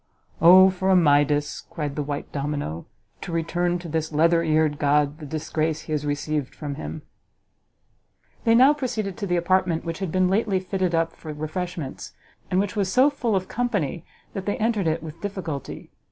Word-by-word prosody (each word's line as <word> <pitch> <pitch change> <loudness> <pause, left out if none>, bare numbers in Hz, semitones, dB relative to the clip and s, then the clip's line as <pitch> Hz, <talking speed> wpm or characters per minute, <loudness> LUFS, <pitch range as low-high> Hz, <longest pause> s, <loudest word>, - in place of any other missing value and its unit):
"O 185 +3 +8
for 190 +1 -1
a 190 - +5
Midas," 145 -3 +3
cried 150 -3 -4
the 150 - -1
white 145 0 -5
domino, 140 - -4 0.3
"to - - -6
return 175 +2 0
to 175 0 -8
this 160 0 -2
leather 165 +2 +3
eared 155 -2 +1
god 145 +1 +2
the 150 - -8
disgrace 155 +1 -2
he 155 - -5
received 145 -1 -2
from 145 -2 -5
him!" 155 +1 -7 1.4
They 230 -1 +4
now 260 +5 +7
proceeded 220 -9 -3
to 200 - -3
the 175 -1 +1
apartment 175 -1 +1
which 165 0 -4
had 190 -4 -3
been 185 +1 +2
lately 195 0 +1
fitted 185 -2 -1
up 165 0 0
for 155 - -8
refreshments, 155 0 -5 0.4
and 185 - +2
which 200 +2 -1
was 195 -3 0
so 265 +3 +5
full 240 -6 -1
of 185 -1 -1
company 200 - -2 0.3
that 195 0 -5
they 205 - 0
entered 215 -5 0
it 160 +1 -1
with 160 +1 -9
difficulty. 185 -9 -5
165 Hz, 180 wpm, -24 LUFS, 150-190 Hz, 1.4 s, O